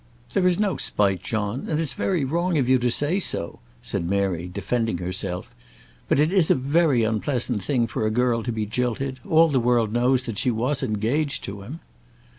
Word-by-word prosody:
"There 185 Hz, -2 st, +3 dB
is 180 Hz, -1 st, +2 dB
no 205 Hz, -3 st, 0 dB
spite, 95 Hz, -3 st, +1 dB
John; 110 Hz, +5 st, -3 dB
and 155 Hz, -, 0 dB
it's 155 Hz, -6 st, +1 dB
very 170 Hz, +2 st, 0 dB
wrong 170 Hz, +4 st, 0 dB
of 130 Hz, -4 st, +1 dB
you 130 Hz, 0 st, +4 dB
to 125 Hz, 0 st, +1 dB
say 150 Hz, +10 st, +1 dB
so," 85 Hz, -, -2 dB, 0.2 s
said 85 Hz, -, -3 dB
Mary, 90 Hz, -2 st, -1 dB
defending 115 Hz, +1 st, -1 dB
herself. 90 Hz, 0 st, -4 dB, 0.6 s
"But -, -, +3 dB
it 155 Hz, +4 st, +2 dB
is 185 Hz, -5 st, +3 dB
a -, -, +5 dB
very 140 Hz, -1 st, +2 dB
unpleasant 110 Hz, 0 st, -1 dB
thing 125 Hz, -2 st, +1 dB
for 110 Hz, -1 st, -2 dB
a -, -, +1 dB
girl 120 Hz, +1 st, +1 dB
to 120 Hz, -, -3 dB
be 110 Hz, -2 st, -2 dB
jilted. 125 Hz, +4 st, -2 dB
All 165 Hz, +1 st, +6 dB
the 140 Hz, -4 st, +1 dB
world 120 Hz, -3 st, +1 dB
knows 125 Hz, +1 st, +2 dB
that 115 Hz, -5 st, -4 dB
she -, -, +1 dB
was 125 Hz, +5 st, -1 dB
engaged 130 Hz, +6 st, -1 dB
to 100 Hz, 0 st, -6 dB
him." 135 Hz, +12 st, -9 dB
125 Hz, 200 wpm, -24 LUFS, 110-145 Hz, 0.6 s, All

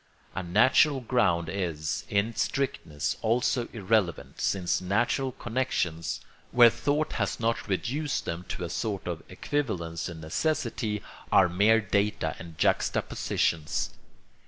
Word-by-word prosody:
A 95 Hz, -, -2 dB
natural 130 Hz, -, +4 dB
ground 100 Hz, -9 st, +1 dB
is, 85 Hz, -4 st, -2 dB
in 105 Hz, +3 st, +1 dB
strictness, 80 Hz, -, -1 dB
also 120 Hz, +2 st, +1 dB
irrelevant, 105 Hz, -5 st, 0 dB
since 90 Hz, -1 st, +1 dB
natural 120 Hz, +8 st, +1 dB
connections, 110 Hz, -11 st, -2 dB, 0.3 s
where 120 Hz, -1 st, +8 dB
thought 150 Hz, +5 st, 0 dB
has 105 Hz, -4 st, -1 dB
not 115 Hz, -1 st, 0 dB
reduced 130 Hz, +9 st, -1 dB
them 85 Hz, +1 st, -4 dB
to -, -, -4 dB
a 85 Hz, -, -3 dB
sort 100 Hz, +1 st, -2 dB
of 85 Hz, -2 st, -3 dB
equivalence 90 Hz, -, -2 dB
and 85 Hz, -2 st, -8 dB
necessity, 105 Hz, -, -1 dB, 0.3 s
are 95 Hz, -, +6 dB
mere 100 Hz, +6 st, +4 dB
data 100 Hz, -4 st, 0 dB
and 85 Hz, -2 st, -10 dB
juxtapositions. 75 Hz, +1 st, 0 dB
100 Hz, 120 wpm, -28 LUFS, 85-120 Hz, 0.3 s, where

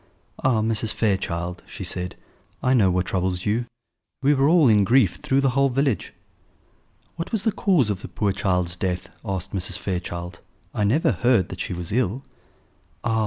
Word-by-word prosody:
"Ah, 125 Hz, -4 st, +3 dB
Mrs. 110 Hz, 0 st, +2 dB
Fairchild," 90 Hz, -4 st, -1 dB
she -, -, -7 dB
said, 90 Hz, 0 st, -3 dB, 0.5 s
"I 130 Hz, -, +3 dB
know 105 Hz, -7 st, +4 dB
what 90 Hz, 0 st, +1 dB
troubles 90 Hz, -1 st, -1 dB
you: 115 Hz, +4 st, 0 dB, 0.6 s
we 145 Hz, +2 st, +5 dB
are 135 Hz, 0 st, +3 dB
all 165 Hz, -4 st, +5 dB
in 105 Hz, -3 st, +5 dB
grief 115 Hz, -3 st, +3 dB
through 140 Hz, -2 st, +1 dB
the 135 Hz, -2 st, +2 dB
whole 140 Hz, +2 st, +3 dB
village." 135 Hz, -2 st, 0 dB, 1.1 s
"What 165 Hz, -, -4 dB
was 220 Hz, -4 st, -1 dB
the 220 Hz, -, +2 dB
cause 170 Hz, -, +2 dB
of 100 Hz, -1 st, -4 dB
the -, -, -7 dB
poor 105 Hz, -2 st, -1 dB
child's 90 Hz, -3 st, 0 dB
death?" 90 Hz, -2 st, -3 dB
asked 95 Hz, -4 st, -4 dB
Mrs. 95 Hz, -1 st, -2 dB
Fairchild. 90 Hz, -1 st, -4 dB, 0.3 s
"I 105 Hz, -, 0 dB
never 130 Hz, +11 st, +3 dB
heard 120 Hz, -7 st, +2 dB
that 90 Hz, -, -7 dB
she 90 Hz, -, -3 dB
was 85 Hz, -1 st, -5 dB
ill." 125 Hz, +2 st, 0 dB, 0.8 s
"Ah! 115 Hz, -1 st, +1 dB
105 Hz, 175 wpm, -23 LUFS, 90-130 Hz, 1.1 s, we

